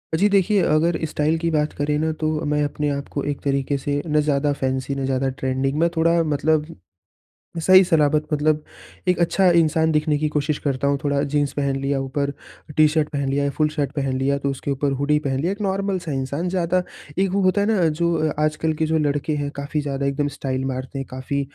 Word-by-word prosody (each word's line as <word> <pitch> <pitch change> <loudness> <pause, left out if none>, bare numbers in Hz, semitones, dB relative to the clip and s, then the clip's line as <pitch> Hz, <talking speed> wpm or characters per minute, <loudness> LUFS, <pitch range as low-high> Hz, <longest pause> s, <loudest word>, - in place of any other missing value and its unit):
जी, 195 +6 +3
देखिए 200 0 +3
अगर 160 +2 +2
स्टाइल 155 +1 0
की 165 +1 -1
बात 150 -1 0
करें 150 +1 0
न 160 +1 0
तो, 155 0 -1
मैं 150 0 +1
अपने 145 0 -1
आप 140 -1 -3
को 140 - -2
एक 140 - -6
तरीके 140 0 0
से 145 +1 -2
ना 150 -1 +2
ज़्यादा 145 -1 +1
फैंसी 130 +1 -1
ना 135 -1 -2
ज़्यादा 135 0 0
ट्रेंडिंग 130 +1 -2
मैं 170 +1 +3
थोड़ा 165 +1 +3
मतलब, 155 +1 0 0.8
सही 185 +3 +7
सलामत 155 -4 +2
मतलब 150 0 +1 0.4
एक 180 -1 +2
अच्छा 180 +2 +3
इंसान 160 0 +2
दिखने 150 -1 +1
की 155 +1 0
कोशिश 150 0 -1
करता 140 -1 0
हूँ। 140 0 +2
थोड़ा 145 -1 +1
जीन्स 145 -2 +1
पहन 140 -1 -1
लिया, 135 0 -1
ऊपर 140 +1 -2 0.5
टी 155 0 +7
शर्ट 155 0 +1
पहन 140 -3 -2
लिया 140 +1 0
या 140 - +1
फुल 155 +1 +1
शर्ट 145 -3 -2
पहन 135 -2 -2
लिया, 140 +1 +1
तो 140 0 -2
उसके 135 +1 -3
ऊपर 140 +1 0
हुडी 150 +1 +2
पहन 135 -3 -2
लिया 170 +6 0
एक 205 +2 -5
नॉर्मल 195 -1 0
सा 170 -3 -6
इंसान 140 +6 -2
ज़्यादा 180 0 +1 0.4
एक 195 0 +2
वो 200 +1 +1
होता 185 +2 +3
है 205 - +1
ना 200 -7 +3
जो 170 +2 0 0.2
अ, - - -3
आजकल 155 +1 0
के 160 - +2
जो 160 +1 +1
लड़के 145 0 0
हैं, 145 -1 -2
काफ़ी 145 +2 -2
ज़्यादा 140 -1 -3
एकदम 140 +1 0
स्टाइल 130 -1 -2
मारते 130 +1 -4
हैं, 135 - -4
काफ़ी 130 +2 -3
150 Hz, 225 wpm, -22 LUFS, 140-160 Hz, 0.8 s, सही